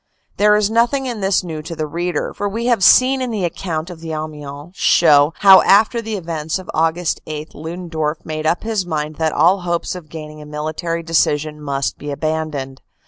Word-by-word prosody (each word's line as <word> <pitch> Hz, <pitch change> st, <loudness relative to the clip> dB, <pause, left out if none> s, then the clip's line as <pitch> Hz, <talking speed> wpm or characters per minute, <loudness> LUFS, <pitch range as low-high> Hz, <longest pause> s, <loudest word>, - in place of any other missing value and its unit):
There 210 Hz, +1 st, +5 dB
is 210 Hz, 0 st, +1 dB
nothing 240 Hz, +4 st, +2 dB
in 240 Hz, -5 st, -4 dB
this 195 Hz, 0 st, +1 dB
new 160 Hz, -3 st, -5 dB
to 165 Hz, +2 st, -7 dB
the 155 Hz, -, -2 dB
reader, 170 Hz, +1 st, -3 dB
for 205 Hz, -, -3 dB
we 225 Hz, +4 st, -4 dB
have 235 Hz, -5 st, +2 dB
seen 260 Hz, +4 st, +6 dB
in 255 Hz, -, -2 dB
the 210 Hz, -5 st, -1 dB
account 170 Hz, 0 st, -4 dB
of 170 Hz, -, -10 dB
the 165 Hz, 0 st, -7 dB
Amiens 150 Hz, +1 st, -7 dB
show 150 Hz, -5 st, +5 dB
how 195 Hz, -1 st, +9 dB
after 220 Hz, +4 st, +4 dB
the 220 Hz, -1 st, -4 dB
events 165 Hz, -3 st, -3 dB
of 185 Hz, -, -9 dB
Aug. 160 Hz, +1 st, +1 dB, 0.3 s
8 155 Hz, 0 st, -6 dB
Ludendorff 160 Hz, -1 st, -4 dB
made 155 Hz, 0 st, -3 dB
up 170 Hz, -, 0 dB
his 220 Hz, -3 st, -1 dB
mind 155 Hz, -3 st, -4 dB
that 160 Hz, -1 st, 0 dB
all 175 Hz, +7 st, +3 dB
hopes 175 Hz, -1 st, -2 dB
of 175 Hz, -4 st, -10 dB
gaining 155 Hz, -1 st, -9 dB
a -, -, -10 dB
military 155 Hz, +3 st, -4 dB
decision 150 Hz, -1 st, 0 dB
must 140 Hz, -2 st, -2 dB
be 145 Hz, -, -6 dB
abandoned. 150 Hz, -3 st, -3 dB
165 Hz, 195 wpm, -19 LUFS, 155-195 Hz, 0.3 s, how